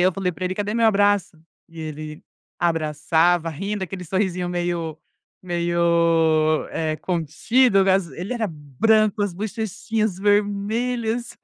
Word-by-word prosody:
eu 185 - +2
falei 185 -1 -2
pra 185 - -6
ele: 185 - -1
"Cadê 205 +2 -2
meu 230 -1 +3
abraço?" 205 -5 +2 0.3
E 165 -1 -14
ele 155 0 -7 0.3
abraçava 165 +1 +1
rindo, 195 +6 -4
daquele 190 0 -5
sorrisinho 180 0 -1
meio 175 -3 -2 0.4
meio 170 -3 +2 0.4
contido, 195 - +2
eh, 190 - +6 0.2
ele 185 +7 -4
era 225 -3 -1
branco, 205 - +1
as 205 -2 -1
bochechinhas 215 +1 -2
vermelhas. 220 +4 0
185 Hz, 120 wpm, -22 LUFS, 165-210 Hz, 0.4 s, eh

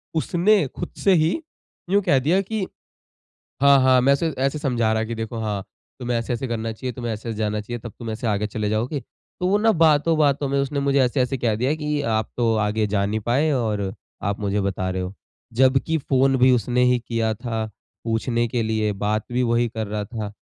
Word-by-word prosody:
उसने 175 +3 +3
खुद 175 - -4
से 195 - +5
ही 160 - +3 0.6
यूँ 200 +1 +4
कह 135 - +3
दिया 170 +9 +2
कि 210 +1 -3 1.0
हाँ, 140 -1 +7
हाँ 130 -1 +5
मैं 140 +2 +5
ऐसे 160 +2 0
ऐसे 135 +3 0
समझा 120 -6 +1
रहा 110 - +1
है 110 - -3
कि 115 - -4
देखो 115 +1 -5
हाँ 105 -3 -2 0.4
तुम्हें 120 -1 -1
ऐसे-ऐसे 120 +2 -2
करना 115 -1 -2
चाहिए, 125 +3 -5
तुम्हें 120 -1 -4
ऐसे-ऐसे 110 0 -6
जाना 105 -1 -1
चाहिए 120 +3 -6
तब 115 -1 -9
तुम 115 -2 -5
ऐसे 115 +2 -3
आगे 105 0 0
चले 105 -1 -2
जाओगे। 120 +7 -1
तो 180 +6 -7
वो 200 +2 +3
न 225 +1 +4
बातों-बातों 150 -3 +3
में 140 0 +1
उसने 140 +1 -1
मुझे 140 0 +2
ऐसे-ऐसे 130 +1 +1
कह 115 -3 0
दिया 130 +6 +1
कि 150 -1 -2
आप 110 0 0
तो 115 -2 +2
आगे 105 +1 0
जा 100 -1 +1
नहीं 110 +2 -1
पाए 145 +6 +2
और 105 -5 -1 0.3
आप 100 +1 -1
मुझे 100 0 0
बता 95 -1 -2
रहे 95 0 -2
हो। 90 +2 -5 0.5
जब 130 0 +5
कि 160 0 +1
फ़ोन 135 -1 +2
भी 130 +1 +5
उसने 125 +1 +2
ही 125 - +2
किया 115 -2 0
था 115 -1 -3 0.4
पूछने 115 +1 0
के 120 -1 -1
लिए, 110 -1 0
बात 105 +2 -1
भी 125 +1 +1
वही 120 0 +2
कर 110 -2 -4
रहा 105 0 -3
था 110 -3 -5
120 Hz, 215 wpm, -23 LUFS, 110-140 Hz, 1.0 s, हाँ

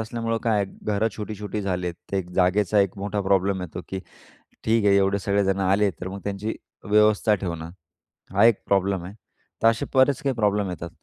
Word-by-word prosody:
असल्यामुळं 115 0 -2
काय 110 -3 +2
आहे - - -1 0.2
घरं 105 +1 +1
छोटी-छोटी 105 -1 -5
झाली 90 -2 -2
आहेत. 85 - -3 0.2
ते 95 - +1
एक 90 -1 -5
जागेचा 95 +2 +2
एक 100 -1 0
मोठा 105 +1 -2
प्रॉब्लेम 95 0 +1
येतो 90 0 -6
की 95 - -4 0.6
ठीक 110 -1 +2
आहे 100 -1 +5
एवढे 100 0 +2
सगळेजण 100 -1 +1
आले, 100 +2 +3
तर 90 +1 -7
मग 100 +1 -7
त्यांची 100 +2 -3 0.3
व्यवस्था 105 0 +4
ठेवणं, 85 -4 -4 0.6
हा 100 +3 +5
एक 115 -3 +4
प्रॉब्लेम 95 -2 +1
आहे. 95 - -8 0.5
तर - - +7
असे 115 0 +2
बरेच 130 0 +4
काही 135 -1 0
प्रॉब्लेम 105 -3 +1
येतात. 85 -1 -6
100 Hz, 190 wpm, -24 LUFS, 95-105 Hz, 0.6 s, तर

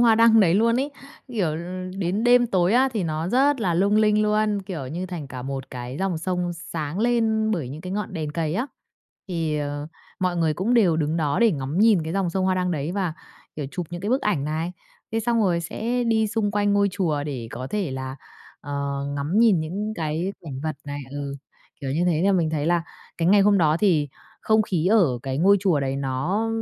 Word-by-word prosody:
hoa 235 -2 +6
đăng 225 0 +6
đấy 180 -3 +4
luôn 230 +3 +3
ấy. 285 - -2 0.4
Kiểu, 185 -11 -1 0.4
đến 195 +5 -1
đêm 245 0 +5
tối 185 -3 +2
á 260 +3 +4
thì 215 - -1
nó 160 +1 -2
rất 270 +4 +3
là 180 -5 +1
lung 200 +4 +3
linh 215 0 +4
luôn, 210 -1 +1
kiểu, 170 -9 -6
như 175 +7 -4
thành 175 -5 -6
cả 130 -2 -7
một 135 0 -5
cái 125 +1 -6
dòng 190 -4 -1
sông 180 0 -2
sáng 165 0 -5
lên 225 -2 +2
bởi 165 - -1
những 150 +4 -7
cái 185 +1 -6
ngọn 210 -1 -3
đèn 155 -2 -3
cày 160 0 -1
á. 245 +6 -1 0.6
Thì, 165 -4 -1
ờ, 145 0 -3 0.3
mọi 180 -1 0
người 160 -2 +1
cũng 220 +9 0
đều 185 -9 +4
đứng 155 0 0
đó 150 -3 0
để 230 -1 +5
ngắm 140 +2 -3
nhìn 210 -5 +5
cái 160 - -4
dòng 190 -3 0
sông 190 +1 -1
hoa 185 0 +2
đăng 180 0 0
đấy 155 +1 -2
và, 190 -5 -1 0.4
kiểu, 145 - -3
chụp 180 -2 -4
những 175 0 -5
cái 200 - -3
bức 260 - +2
ảnh 180 -10 0
này. 160 +3 -2 0.4
Thế 225 - +1
xong 230 +1 +1
rồi 175 -3 +2
sẽ 235 +8 -2
đi 220 -1 +2
xung 210 -1 -1
quanh 205 -1 +1
ngôi 200 0 +3
chùa 165 -7 -1
để 125 -6 -5
có 130 +1 -5
thể 195 0 -2
là, 130 0 -5 0.4
ờ, 140 -1 -3
ngắm 150 +8 0
nhìn 220 -8 +5
những 200 +7 -3
cái 165 +3 -2
cảnh 135 -4 -6
vật 155 -2 -3
này 145 0 -5
ừ, 145 -1 -5 0.5
kiểu 135 - -3
như 160 +6 +1
thế, 160 -3 +2
nên 195 0 +3
mình 165 -3 +1
thấy 150 -1 -1
là 170 0 +2 0.4
cái 165 - +2
ngày 205 +2 +6
hôm 200 0 +4
đó 155 -3 +3
thì 165 -6 +2 0.3
không 220 0 +3
khí 180 -4 -1
ở 180 - +3
cái 135 0 -3
ngôi 195 +5 +5
chùa 175 -8 +2
đấy, 135 0 -1
nó 145 +12 -1
175 Hz, 230 wpm, -24 LUFS, 150-210 Hz, 0.6 s, hoa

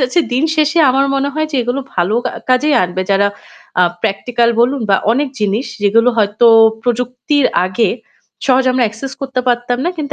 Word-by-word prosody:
যাচ্ছে 255 +7 +1
দিনশেষে 315 +3 +1
আমার 275 +2 +2
মনে 275 +1 0
হয় 310 0 -1
যে 275 - -1
এগুলো 245 +3 -2
ভালো 180 +4 0
কা - - -3 0.2
কাজেই 280 +4 +2
আনবে। 180 +1 -2
যারা 200 +1 +3 0.5
আ - - +5 0.2
practical 235 +3 0
বলুন 255 +3 +1
বা 195 - +5 0.2
অনেক 280 +3 0
জিনিস 210 +5 -1 0.2
যেগুলো 230 +4 +3
হয়তো 210 +2 +2 0.4
প্রযুক্তির 250 +3 0 0.2
আগে 185 +5 0 0.6
সহজে 260 -1 +3
আমরা 255 -1 +1
access 260 +6 -8
করতে 265 -2 -2
পারতাম 245 0 0
না। 350 - 0
কিন্তু 290 -2 -5
250 Hz, 170 wpm, -15 LUFS, 220-275 Hz, 0.6 s, আ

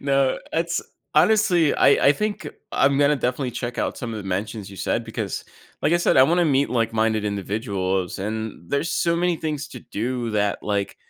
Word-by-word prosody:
No, 135 -1 +2
it's 170 +1 0 0.3
honestly, 175 -2 +4
I 140 - +5
I - - +7
think 205 +1 -3 0.3
I'm 140 0 +3
gonna 145 +1 +4
definitely 125 0 -1
check 120 +1 -4
out - - -1
some 120 -2 -5
of - - -4
the 100 - -7
mentions 100 +2 -3
you 100 - -11
said, 105 +5 -1
because, 110 -3 -4 0.4
like 165 - +2
I - - +5
said, 175 - +2
I 130 - +8
wanna 170 +6 +3
meet 140 -2 +2
like-minded 115 -2 +1
individuals, 100 -2 -2
and 105 -3 -5
there's 140 +4 0
so 170 0 +1
many 175 0 +1
things 150 -2 -3
to 125 -5 -10
do 120 +3 -3
that, 105 -1 0
like, 100 -1 -2
125 Hz, 190 wpm, -23 LUFS, 105-150 Hz, 0.4 s, I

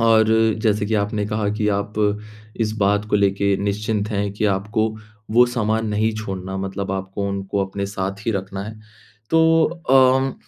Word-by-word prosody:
और 115 -1 +5 0.4
जैसे 105 -2 +1
कि 110 - -1
आपने 105 0 0
कहा 105 -1 -1
कि 105 0 -1
आप 100 +1 -1 0.7
इस 110 -1 +1
बात 100 +1 +2
को 105 - +3
लेके 100 0 +2
निश्चिंत 105 +1 -1
हैं 100 -1 -1
कि 105 - -3
आपको 105 +3 0 0.4
वो 120 +2 +6
सामान 110 -2 -1
नहीं 110 +1 +1
छोड़ना, 95 -3 -5
मतलब 95 0 -4
आपको 95 +1 -3
उनको 100 0 -2
अपने 100 +1 -4
साथ 100 +1 -5
ही - - +2
रखना 95 0 -4
है। 110 0 -8 0.5
तो 165 0 +5 0.3
अम 130 0 +5
105 Hz, 165 wpm, -21 LUFS, 100-110 Hz, 0.7 s, वो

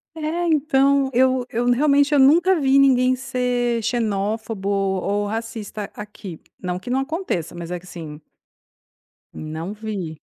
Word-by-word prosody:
É, 325 +2 -2
então, 275 -3 +3
eu 255 0 +3
eu 240 +2 0
realmente 285 +2 +3
eu 290 - +5
nunca 330 +6 +5
vi 270 0 +4
ninguém 255 -2 +4
ser 250 -2 -1
xenófobo 215 -2 -2
ou 200 +1 0
racista 220 -1 -5
aqui. 205 -5 -9 0.2
Não 180 -1 -3
que 240 - -9
não 260 +2 +1
aconteça, 270 - -3
mas 170 -1 -7
é 180 0 -3
que 180 - -19
assim 160 -4 -9 1.1
não 160 +5 -6
vi. 200 -8 -6
235 Hz, 140 wpm, -22 LUFS, 195-270 Hz, 1.1 s, eu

